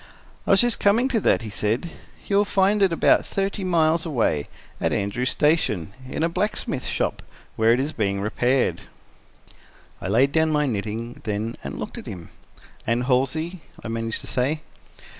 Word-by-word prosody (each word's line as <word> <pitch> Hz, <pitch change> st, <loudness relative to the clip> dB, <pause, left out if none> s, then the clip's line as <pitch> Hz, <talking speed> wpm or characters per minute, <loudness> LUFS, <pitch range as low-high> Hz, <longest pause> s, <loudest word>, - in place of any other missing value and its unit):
"I -, -, -3 dB
was 195 Hz, -, +6 dB
just 240 Hz, -2 st, +2 dB
coming 225 Hz, +6 st, +3 dB
to 235 Hz, -, +1 dB
that," 190 Hz, -, +2 dB
he 110 Hz, -, -6 dB
said. 110 Hz, -, -1 dB, 0.3 s
"You 200 Hz, -, +1 dB
will 205 Hz, -, +5 dB
find 200 Hz, +1 st, +2 dB
it 195 Hz, -2 st, +4 dB
about 165 Hz, -, +4 dB
thirty 195 Hz, 0 st, -2 dB
miles 165 Hz, -2 st, +3 dB
away, 115 Hz, -, 0 dB, 0.3 s
at -, -, 0 dB
Andrews 110 Hz, +6 st, -1 dB
Station, 110 Hz, -, +1 dB, 0.2 s
in 155 Hz, -, -2 dB
a -, -, +4 dB
blacksmith 180 Hz, -7 st, -2 dB
shop, -, -, -1 dB, 0.3 s
where 110 Hz, +1 st, +4 dB
it 120 Hz, -, +3 dB
is 145 Hz, +4 st, -1 dB
being 100 Hz, -3 st, -1 dB
repaired." 125 Hz, +5 st, +1 dB, 1.2 s
I -, -, -4 dB
laid 125 Hz, +8 st, +3 dB
down 160 Hz, +1 st, +3 dB
my 150 Hz, -1 st, +2 dB
knitting 115 Hz, 0 st, -4 dB
then 110 Hz, +1 st, -2 dB
and -, -, -5 dB
looked -, -, -5 dB
at -, -, -11 dB
him. 85 Hz, -3 st, -8 dB, 0.6 s
"And 115 Hz, +2 st, +1 dB
Halsey?" 140 Hz, +7 st, 0 dB, 0.2 s
I 115 Hz, -, -5 dB
managed 115 Hz, 0 st, -3 dB
to -, -, -6 dB
say. 140 Hz, +5 st, 0 dB
135 Hz, 175 wpm, -24 LUFS, 115-170 Hz, 1.2 s, was